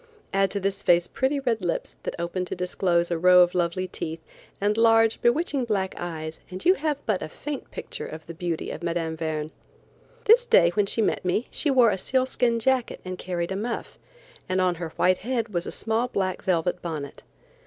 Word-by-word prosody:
Add 195 0 +3
to 200 - -2
this 195 0 -1
face 175 0 +4
pretty 270 +2 0
red 240 -5 0
lips, 175 - -2
that - - -4
opened 180 +1 -3
disclose 175 -1 0
a 170 - 0
row 180 +1 +7
of 175 0 +4
lovely 180 +1 0
teeth, 160 -2 -5 0.4
and 205 +1 +1
large, 225 0 +4
bewitching 280 +2 +2
black 195 -4 -1
eyes, 160 -2 -5
and 185 +1 -6
you 365 - +7
have 305 -4 -1
but 210 -4 0
a - - -5
faint 290 - -6
picture - - -6
of 160 0 -9
the 165 - -8
beauty 170 -1 -3
of - - -7
Mme. 165 -1 -1
Verne. 155 -1 -3 0.7
This 480 +3 +6
day 170 - +6
when 205 +2 +1
she 225 - +1
met - - 0
me 185 +6 0
she 305 - 0
wore 250 -5 +5
a 190 - -2
sealskin 255 -1 +1
jacket 255 +1 0
and 185 0 -5
carried 175 -1 -3
a - - -1
muff, 230 +4 -4 0.5
and 185 0 +1
on 185 -1 +3
her 165 - -3
white 185 0 +3
head 235 0 -2
was 175 -4 -2
a - - -4
small 225 +2 -1
black 190 -6 -2
velvet 180 0 0
bonnet. 150 -5 -5
185 Hz, 200 wpm, -25 LUFS, 175-230 Hz, 0.7 s, row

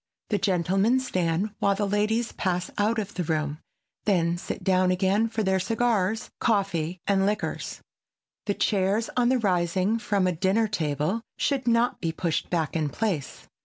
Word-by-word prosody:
The 205 - +2
gentlemen 195 +6 +2
stand 185 -4 -1
while 200 0 +2
the 205 0 -1
ladies 215 +3 0
pass 180 -1 -2
out 215 +3 +2
of 205 -1 -3
the 180 - -2
room, 155 -2 -1 0.5
then 170 -4 +2
sit 175 - -6
down 185 -1 +3
again 195 +4 +2
for 220 -1 -1
their 190 -1 +2
cigars, 225 0 0
coffee 190 -6 0
and 195 -1 +2
liquors. 210 +1 -3 0.7
The 205 - +1
chairs, 200 +2 +1
on 245 -1 +3
rising 185 +2 +1
from 200 -4 +1
a 185 - +2
dinner 195 +6 +2
table, 155 +1 -1 0.2
should 270 -3 0
not 235 +1 +2
be 165 -2 0
pushed 165 0 -2
back 165 -3 -1
in 155 -2 0
place. 185 - -3
195 Hz, 160 wpm, -26 LUFS, 175-220 Hz, 0.7 s, down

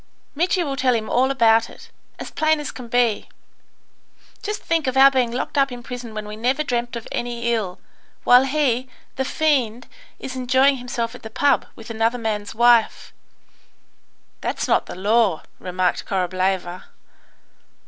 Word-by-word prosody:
Mitri 350 +4 +1
will 280 -4 -3
tell 255 -2 +2
him 220 -1 -3
all 260 +2 +3
about 230 -3 +3
it, - - -15 0.3
as - - -8
plain 315 0 +1
as 295 - -5
can 250 -2 -9
be. 235 -2 +1 1.1
Just 420 0 -4
think 325 -4 0
of 260 0 -1
our 270 +1 +8
being 255 -3 +1
locked 255 +4 -2
up 275 -1 +2
in 245 -1 -8
prison 245 -2 -8
when 210 -1 -5
we 210 - -7
never 255 +7 0
dreamt 240 -3 -2
of 235 - -6
any 235 0 -2
ill, 200 -6 -3 0.4
while 250 +2 +6
he, 260 -3 0 0.3
the 265 - -1
fiend, 260 -5 0 0.3
is 260 - -7
enjoying 260 +2 +3
himself 245 -2 -4
at 250 - -11
the 220 - -8
pub, 285 +6 +1
with 225 0 -10
another 225 +2 0
man's 215 -3 -3
wife." 235 -1 +3 1.3
"That's - - -2
not - - +2
the - - -7
law," 205 -2 +2 0.2
remarked 180 0 -1
Korableva. 185 -1 -1
240 Hz, 160 wpm, -22 LUFS, 220-265 Hz, 1.3 s, our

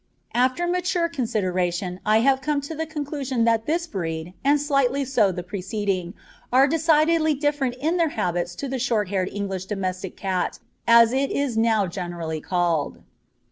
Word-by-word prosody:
After 255 +8 +2
mature 355 0 0
consideration, 185 - -1
I 215 +1 +5
have 265 +1 +3
come 295 +1 0
to 285 +3 -6
the 320 +1 -3
conclusion 285 -5 -2
that 230 -1 +2
this 335 +3 0
breed, 165 - -4
and 285 +2 +4
slightly 275 -2 +1
so 230 -7 +2
the 180 -1 -5
preceding, 190 -1 -3 0.4
are 260 +2 +6
decidedly 315 0 +3
different 285 -3 0
in 315 +7 0
their 335 -2 +2
habits 175 -6 -2
to 280 - -4
the 260 0 -3
short 225 -6 0
haired 190 -1 0
English 195 -2 -4
domestic 190 -2 -4
cat, 185 -2 -1 0.3
as 230 0 +7
it 270 +1 +1
is 280 -4 -1
now 225 -2 +3
generally 170 -4 -4
called. 170 -4 -1
230 Hz, 160 wpm, -24 LUFS, 185-285 Hz, 0.4 s, as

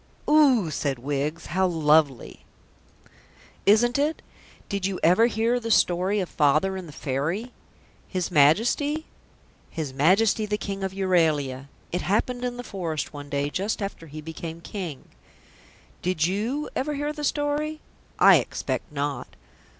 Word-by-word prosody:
"O 285 - +5
oh!" - - -4
said 140 -2 -1
Wiggs. 145 +5 -3
"How 190 +3 +1
lovely!" 155 -6 +2 1.2
"Isn't 240 +5 +4
it? 300 +3 0 0.4
Did 200 -1 -1
you 195 -2 -4
ever 180 +8 +5
hear 235 +2 +1
the 230 -1 -5
story 190 0 +2
of 185 - -2
Father 155 +6 +2
and 185 -2 -6
the - - -10
Fairy?" 150 - -3 0.6
"His 185 -1 -3
Majesty?" 235 - +3 0.6
"His 155 -5 -5
Majesty 200 +9 +3
the 210 0 -1
King 195 -2 -5
of 190 - -2
Euralia. 155 -8 +1 0.2
It 180 - -1
happened 245 +5 0
in 245 -1 -3
the 245 - -5
forest 165 - -4
one 145 -1 -8
day 145 0 -1
just 200 +7 -2
after 195 -5 -5
he 155 +1 -8
became 160 +1 -7
King." 170 -6 -6 1.0
Did 180 -3 +1
you 225 - -1
ever 295 +3 -1
hear 295 +1 -2
the 300 -1 -7
story? 295 +1 -1 0.4
I - - +8
expect - - -3
not. 145 -1 -4
185 Hz, 145 wpm, -25 LUFS, 155-230 Hz, 1.2 s, I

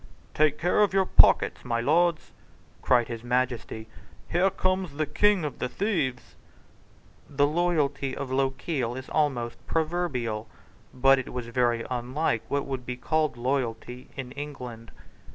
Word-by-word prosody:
"Take 150 -1 +3
care 180 +4 +2
of 200 -2 +3
your 190 -1 +4
pockets, - - +4
my 115 -2 -1
lords," 165 +6 +2 0.5
cried 120 -2 +3
his 115 -1 -6
Majesty; 120 -3 -1 0.4
"here 180 +3 +3
comes 185 -3 -1
the 155 +2 -1
king 190 +4 +2
of 145 - -5
the 125 - -2
thieves." 140 - -2 1.0
The 145 0 +2
loyalty 145 -4 0
of 135 -2 -5
Lochiel 135 -1 -1
is 130 - -8
almost 125 -6 -1
proverbial: 150 -10 -1 0.4
but 135 +1 +4
it 130 - -6
was 125 -2 -5
very 120 -1 +1
unlike 125 0 -1
what 140 0 -1
was 135 -1 -3 0.2
called 155 -4 +1
loyalty 125 -1 -2
in 130 -2 -5
England. 125 -5 -7
135 Hz, 135 wpm, -27 LUFS, 125-155 Hz, 1.0 s, your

